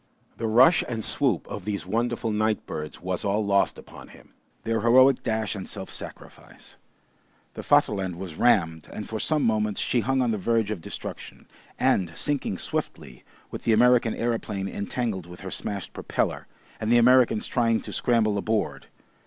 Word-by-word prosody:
The 115 - -2
rush 125 +10 +5
and 115 -3 -3
swoop 125 - 0
of 105 - -6
these 100 0 -3
wonderful 115 0 -1
night 110 0 0
birds 75 0 -6
was 90 -1 -2
all 105 +1 0
lost 100 -1 +2
upon - - -12
him; - - -18 0.3
their 115 -1 -1
heroic 130 +3 +5
dash 110 -2 -1
and 100 -3 -7
self - - -6
sacrifice. - - -8 0.8
The - - -7
Vaterland 95 -3 +2
was 90 -2 -7
rammed, 80 -6 +2
and 105 - -6
for 110 - -4
some 155 +4 0
moments 105 -2 +1
she 125 - +1
hung 130 +3 +1
on 120 - +1
the 105 - -2
verge 110 +1 +1
of 100 -6 -4
destruction, - - -8 0.3
and 85 -4 +1
sinking 140 -9 -1
swiftly, 65 -7 -5 0.3
with - - -7
the 115 - +3
American 120 0 +4
aeroplane 110 -4 -2
entangled 100 -2 -3
with 90 0 -11
her 95 0 -7
smashed 100 -3 -5
propeller, - - -2 0.3
and 110 +1 -1
the 120 - +6
Americans 120 -2 +4
trying 115 -2 +1
to - - -8
scramble 110 -4 +1
aboard. 110 +1 -2
110 Hz, 170 wpm, -25 LUFS, 100-120 Hz, 0.8 s, the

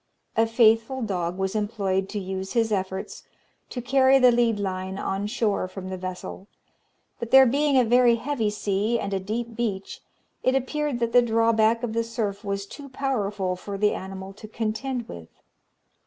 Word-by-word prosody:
A 225 0 +3
faithful 225 +2 +3
dog 180 -4 -2
was 190 0 -1
employed 200 -3 -1
to 210 - -4
use 190 0 -5
his 225 -2 +1
efforts 190 -1 -3 0.5
to 245 - -5
carry 265 +1 +5
the 250 -2 +6
lead 235 -2 +2
line 190 -1 -3
on 195 +1 -2
shore 210 -5 0
from 185 0 -8
the - - -3
vessel; 185 +1 -7 0.7
but 235 - -5
there 265 +1 +8
being 280 +2 +2
a 255 - +6
very 240 +1 +5
heavy 235 -3 -1
sea, 210 +2 0
and 200 -2 -3
a 195 - 0
deep 225 +4 -4
beach, 205 -5 -3 0.4
it 255 - +2
appeared 285 +1 -1
that 230 0 0
the 245 - +7
drawback 230 0 +2
of 230 -2 -2
the 230 0 +1
surf 215 -3 -3
was 200 -1 -3
too 280 +7 -10
powerful 210 -9 -2
for 195 +2 -6
the 210 +1 +2
animal 190 0 -7
to 210 +2 -11
contend 230 +3 -3
with. 80 -2 -10
220 Hz, 175 wpm, -25 LUFS, 195-240 Hz, 0.7 s, there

